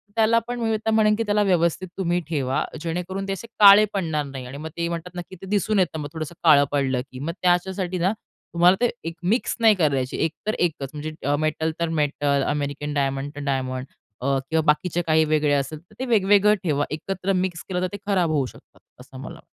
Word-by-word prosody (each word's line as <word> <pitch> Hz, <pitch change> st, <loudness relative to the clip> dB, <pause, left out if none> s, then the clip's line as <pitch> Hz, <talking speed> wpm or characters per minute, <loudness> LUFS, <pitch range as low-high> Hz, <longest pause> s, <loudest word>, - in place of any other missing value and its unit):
त्याला 225 Hz, +1 st, +4 dB
पण 245 Hz, 0 st, -4 dB
मी 225 Hz, -1 st, 0 dB
म्हणेन 215 Hz, -1 st, +4 dB
की 230 Hz, -, -1 dB
त्याला 210 Hz, -1 st, +1 dB
व्यवस्थित 180 Hz, -1 st, +1 dB
तुम्ही 175 Hz, -2 st, 0 dB
ठेवा. 135 Hz, -4 st, 0 dB, 0.2 s
जेणेकरून 180 Hz, +4 st, -4 dB
ते 195 Hz, -, -1 dB
असे 230 Hz, +4 st, -7 dB
काळे 205 Hz, +1 st, +9 dB
पडणार 160 Hz, -6 st, -1 dB
नाही 135 Hz, -2 st, -7 dB
आणि 135 Hz, +3 st, -8 dB
मग 160 Hz, +2 st, -6 dB
ते 170 Hz, 0 st, -1 dB
म्हणतात 170 Hz, +1 st, -6 dB
नक्की 175 Hz, +2 st, -7 dB
ते -, -, -8 dB
दिसून 210 Hz, 0 st, +1 dB
येतं 165 Hz, -3 st, 0 dB
मग 145 Hz, -1 st, -5 dB
थोडंसं 160 Hz, +1 st, -6 dB
काळं 145 Hz, -3 st, +6 dB
पडलं 135 Hz, -3 st, 0 dB
की 130 Hz, -, -9 dB
मग 155 Hz, +4 st, -3 dB
त्याच्यासाठी 180 Hz, +1 st, +1 dB
ना 185 Hz, +4 st, +2 dB, 0.4 s
तुम्हाला 175 Hz, +2 st, +5 dB
ते 240 Hz, -, +4 dB, 0.2 s
एक 165 Hz, -, -5 dB
मिक्स 220 Hz, +8 st, +1 dB
नाही 220 Hz, -2 st, +6 dB
करायची. 140 Hz, -7 st, 0 dB
एक 160 Hz, -, -1 dB, 0.2 s
तर 215 Hz, -, +1 dB
एकच 150 Hz, -6 st, -1 dB
म्हणजे 150 Hz, -1 st, -3 dB
मेटल 155 Hz, +1 st, 0 dB
तर 170 Hz, -1 st, 0 dB
मेटल, 145 Hz, -3 st, 0 dB
अमेरिकन 145 Hz, 0 st, -2 dB
डायमंड 135 Hz, 0 st, -1 dB
तर -, -, -6 dB
डायमंड 130 Hz, -1 st, -2 dB, 0.4 s
किंवा 140 Hz, +4 st, 0 dB
बाकीचे 175 Hz, +3 st, +1 dB
काही 160 Hz, 0 st, +4 dB
वेगळे 150 Hz, -1 st, +1 dB
असेल 145 Hz, +2 st, -1 dB
तर 175 Hz, +6 st, -24 dB
ते 260 Hz, -, -2 dB
वेगवेगळं 205 Hz, -2 st, +4 dB
ठेवा. 145 Hz, -4 st, +1 dB
एकत्र 190 Hz, +4 st, -2 dB
मिक्स 180 Hz, -3 st, -1 dB
केलं 180 Hz, -1 st, -1 dB
तर 185 Hz, -, +1 dB
ते -, -, -3 dB
खराब 185 Hz, -5 st, +2 dB
होऊ 140 Hz, -4 st, +1 dB
शकतात -, -, -15 dB, 0.2 s
असं -, -, -13 dB
मला. -, -, -9 dB
165 Hz, 205 wpm, -23 LUFS, 145-190 Hz, 0.4 s, काळे